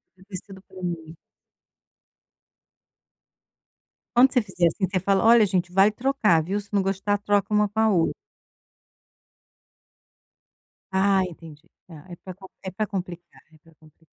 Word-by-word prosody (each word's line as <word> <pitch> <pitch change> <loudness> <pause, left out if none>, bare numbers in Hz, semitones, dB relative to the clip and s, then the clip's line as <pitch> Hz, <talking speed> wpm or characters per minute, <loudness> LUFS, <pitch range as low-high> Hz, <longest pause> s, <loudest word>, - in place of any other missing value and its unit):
podia 185 0 -21
ter 195 - -8
sido 190 +1 -13
para 190 -1 -13
mim. 165 -2 -5 3.0
Quando 255 +2 +6
você 250 -2 +2
fizer 185 -4 0
assim, 190 +4 0
você 185 0 -2
fala: 195 +2 +1
"Olha, 230 -2 +6
gente, 180 -2 -2
vai 195 +3 +5
trocar, 215 -8 +1
viu. 195 +6 -3
Se 200 - -13
não 200 -1 +2
gostar, 195 +2 -1
troca 205 0 0
uma 210 0 +3
com 215 +2 -3
a 220 - +4
outra". 175 -6 +2 2.8
Ah, 195 0 +3
entendi. 160 -3 -11 0.2
Tá, 160 -5 -13
é 175 - -9
para 185 - -9
com 190 +1 -14 0.2
é 190 - -5
para 210 +4 -3
complicar, 180 -3 -7
é - - -19
para 165 0 -24
complicar. 155 +1 -23
190 Hz, 150 wpm, -24 LUFS, 175-205 Hz, 3.0 s, Quando